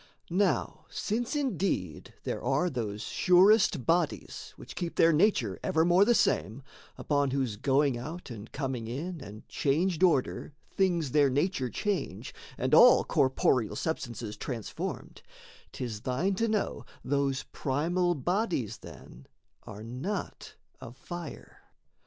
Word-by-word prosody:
Now 195 +3 0
since 230 +6 -2
indeed 190 - -2
there - - -4
are 140 +8 +1
those 110 -5 -4
surest 185 - +4
bodies 165 -1 -1
Which - - -11
keep 170 -2 -4
their 165 0 +5
nature 150 - +2
evermore 175 +4 +3
the 240 +2 +4
same, 115 - +1 0.3
Upon 145 -2 +1
whose 130 -5 -1
going 135 +2 +1
out 155 +3 -7
and 110 -1 -9
coming 130 -5 -3
in 160 +8 -5
And 105 +1 -11
changed 160 +5 0
order 155 -4 +1 0.2
things 175 -7 +1
their 145 -1 +4
nature 140 -1 0
change, 195 - -3 0.2
And - - -1
all - - +8
corporeal 130 -3 +1
substances 120 -8 -4
transformed, 115 -3 -5 0.5
'Tis 115 -5 -5
thine 135 - 0
to 230 +4 0
know 215 -2 -1 0.2
those 140 0 0
primal 175 +6 0
bodies, 165 - -1
then, 65 +2 -13 0.4
Are 105 +2 -8
not 135 - -5 0.2
of 120 +3 -11
fire. 175 0 -9
145 Hz, 125 wpm, -29 LUFS, 125-180 Hz, 0.5 s, all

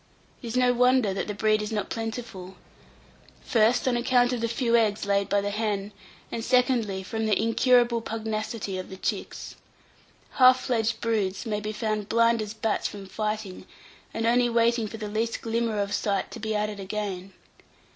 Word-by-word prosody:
It 240 - -7
is 230 +2 -2
no 250 -1 +4
wonder 250 -4 +3
that 195 - -3
the 210 - -4
breed 215 0 +2
is 210 +1 -4
not 210 -2 -3
plentiful 225 -5 -5 0.9
first, 235 +3 +2
on 250 - +2
account 245 +1 +2
of 240 - -2
the 230 - +1
few 235 0 +1
eggs 215 -3 +2
laid 200 0 +1
by 200 - +2
the 205 0 -2
hen; 210 -1 -2 0.4
and, 230 - -3
secondly, 245 -6 +1
from 220 +3 -3
the 210 - +2
incurable 240 0 +3
pugnacity 220 -3 -4
of 185 - -7
the 190 - -9
chicks. - - -4 0.8
Half 255 0 +7
fledged 230 -2 -1
broods 210 -3 -1
may 210 -2 -1
be 210 +1 -4
found 215 -1 -3
blind 230 0 +3
as 210 +1 -5
bats 220 -1 -1
from 200 -1 -9
fighting, 210 -1 -4 0.4
and 225 - -2
only 240 +1 +3
waiting 230 -1 +2
for 225 - -8
the 215 -1 -5
least 225 +2 -2
glimmer 230 -1 -1
of 200 0 -1
sight 200 -2 -1
to - - -8
be 220 0 -2
at 210 0 +1
it 205 - -9
again. 195 -1 -4
220 Hz, 185 wpm, -26 LUFS, 205-235 Hz, 0.9 s, Half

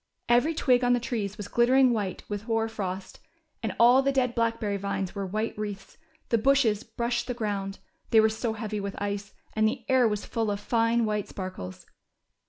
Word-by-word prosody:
Every 245 +7 +3
twig 250 -4 +3
on 245 0 +4
the 245 - +2
trees 220 -4 -3
was 205 -2 -6
glittering 250 +3 +4
white 200 -5 -3
with 205 0 -5
hoar 225 -1 +1
frost, 195 -4 -5 0.4
and 215 -4 -3
all 245 +3 +7
the 275 0 +1
dead 255 -3 +1
blackberry 230 -3 0
vines 195 -1 -3
wore 200 -1 -3
white 215 +4 -2
wreaths, 205 +2 -6 0.3
the 230 - +3
bushes 240 -4 +3
brushed 235 +1 -2
the 250 - -3
ground, 200 -4 -3 0.3
they 225 - +6
were 220 - +6
so 220 +1 -2
heavy 215 -1 -4
with 200 -1 -5
ice, 200 0 -4 0.2
and 220 0 +3
the 220 - -3
air 260 -3 +4
was 210 -1 -2
full 225 -2 -1
of 200 -1 -1
fine 230 +2 +2
white 210 -1 -1
sparkles. 185 - -7
220 Hz, 190 wpm, -27 LUFS, 205-240 Hz, 0.4 s, all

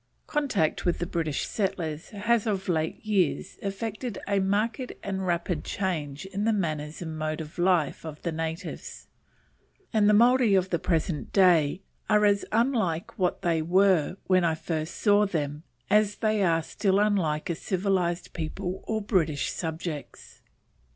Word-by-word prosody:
Contact 250 - 0
with 175 - +1
the 175 - -2
British 160 -4 -2
settlers 180 -5 -3
has 225 +2 +1
of 200 -2 -1
late 160 +2 -1
years 195 -7 0
effected 215 +3 -4
a 200 -1 +2
marked 215 +6 0
and 190 -1 -3
rapid 170 -2 -1
change 155 -5 -3
in 195 +1 -3
the 225 - +3
manners 155 -5 -2
and 160 -1 -6
mode 155 0 -2
of 160 +2 -8
life 175 -5 +2
of 155 -2 -7
the 170 - -1
natives, 160 +1 -5 0.9
and 210 -2 +4
the - - +5
Maori 240 -1 +5
of 185 0 +1
the 170 - +1
present 165 -3 -1
day 180 -2 +4 0.3
are 210 -1 +5
as 200 -1 +3
unlike 220 -6 0
what 180 +1 0
they 165 -3 +2
were 185 0 +3
when 185 -1 +3
I 165 -2 +2
first 160 0 -4
saw 205 -1 +4
them 150 -5 -2 0.3
as 210 0 +3
they 215 -2 +1
are 165 -3 +2
still 195 +3 +1
unlike 180 -7 +1
a - - +1
civilized 180 -1 -1
people 180 +3 -4
or 220 -1 -1
British 165 - +1
subjects. 160 -2 -6
185 Hz, 155 wpm, -27 LUFS, 160-205 Hz, 0.9 s, the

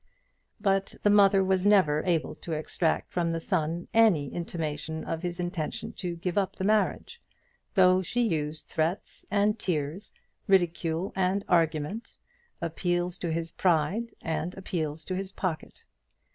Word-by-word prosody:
But 195 -2 +1
the 205 - +5
mother 200 -1 +6
was 190 -1 +1
never 185 -8 +4
able 165 -3 +1
to 165 - -6
extract 155 +1 -1
from 170 -2 +1
the 165 - -1
son 165 +1 -1
any 190 -12 +4
intimation 160 -2 -4
of 165 0 -3
his 175 -1 -4
intention 175 -3 -3
to 175 -2 -3
give 175 +3 -1
up 195 - -2
the - - -4
marriage, 215 - +1 0.5
though 185 -1 +6
she 245 +6 -1
used 155 -7 -2
threats 165 +5 -2
and 210 +1 +2
tears, 160 +2 -2 0.4
ridicule 175 -1 +1
and 190 +1 +1
argument, 165 +5 0 0.4
appeals 175 +2 -1
to 170 - -2
his 165 0 -2
pride 185 +7 +1
and 165 +2 -3
appeals 160 -5 -3
to 185 - -3
his 190 +1 -4
pocket. 180 -5 -4
175 Hz, 145 wpm, -28 LUFS, 160-195 Hz, 0.5 s, mother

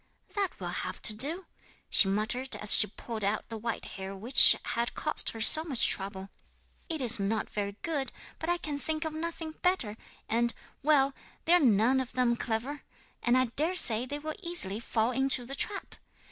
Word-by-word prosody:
'"That 400 -3 -4
will 175 -2 -6
have 185 0 -7
to - - +5
do," 305 - +1 0.4
she 195 - +8
muttered 220 +7 -3
as 210 - +4
she - - +5
pulled 220 +2 -9
out 205 +2 -3
the 225 - -7
white 230 0 -5
hair 195 0 -9
which 230 +7 +7
had 235 +1 -3
cost - - +2
her 225 - -8
so 310 +8 +8
much 275 -8 0
trouble. 195 0 -3 0.6
"It 315 -5 -3
is 230 -3 +5
not 210 +2 -3
very 200 -1 -5
good, 295 -5 -3 0.3
but 320 - -5
I 350 - 0
can 295 -4 -6
think 310 +1 -4
of 315 - -5
nothing 325 0 -6
better; 360 - -1 0.3
and 235 +1 0 0.3
well, 280 -2 +1 0.3
they 335 - +3
are 355 - +5
none 245 - +2
of 260 -2 -6
them 250 -2 0
clever, 235 +6 -5 0.4
and 240 +1 +1
I 255 - +2
dare 325 +6 -1
say 235 -7 +2
they 285 - -5
will 310 +1 -7
easily 340 - +2
fall 230 0 -2
into 265 0 +1
the 270 - -9
trap." 395 +8 -5
250 Hz, 190 wpm, -28 LUFS, 220-310 Hz, 0.6 s, she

